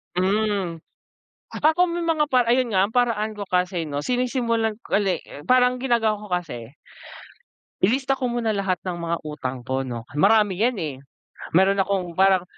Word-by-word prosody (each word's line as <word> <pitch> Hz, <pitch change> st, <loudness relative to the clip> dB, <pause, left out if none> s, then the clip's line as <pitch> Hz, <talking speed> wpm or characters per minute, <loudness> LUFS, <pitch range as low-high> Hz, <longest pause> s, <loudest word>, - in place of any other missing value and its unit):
Hmm, 195 Hz, -1 st, 0 dB, 0.8 s
ako 340 Hz, +4 st, +2 dB
may 345 Hz, -, -2 dB
mga 300 Hz, -3 st, +1 dB
para 250 Hz, -2 st, +3 dB
ayun 245 Hz, -1 st, +2 dB
nga 190 Hz, 0 st, +3 dB
ang 220 Hz, -, -16 dB
paraan 220 Hz, -3 st, +1 dB
ko 205 Hz, -, -5 dB
kasi, 180 Hz, -2 st, -1 dB
'no? 145 Hz, -2 st, -4 dB
Sinisimulan 230 Hz, -, -1 dB
ko -, -, -2 dB
uli 200 Hz, -2 st, +1 dB, 0.2 s
parang 250 Hz, 0 st, +4 dB
ginagawa 235 Hz, -4 st, +1 dB
ko 210 Hz, -, -9 dB
kasi. 135 Hz, -10 st, -4 dB, 1.1 s
Ililista 260 Hz, +7 st, +2 dB
ko 255 Hz, -2 st, -2 dB
muna 235 Hz, -2 st, -1 dB
lahat 195 Hz, -2 st, 0 dB
ng 180 Hz, -2 st, -3 dB
mga 170 Hz, 0 st, -1 dB
utang 130 Hz, -4 st, -5 dB
ko, 130 Hz, +1 st, -1 dB
'no? 120 Hz, -3 st, -5 dB
marami 200 Hz, +4 st, +3 dB
yan, 240 Hz, +2 st, +2 dB
eh, 150 Hz, -5 st, -4 dB, 0.6 s
meron 195 Hz, +2 st, +4 dB
akong 185 Hz, -4 st, -2 dB
parang, 190 Hz, -2 st, +5 dB
205 Hz, 160 wpm, -23 LUFS, 180-245 Hz, 1.1 s, parang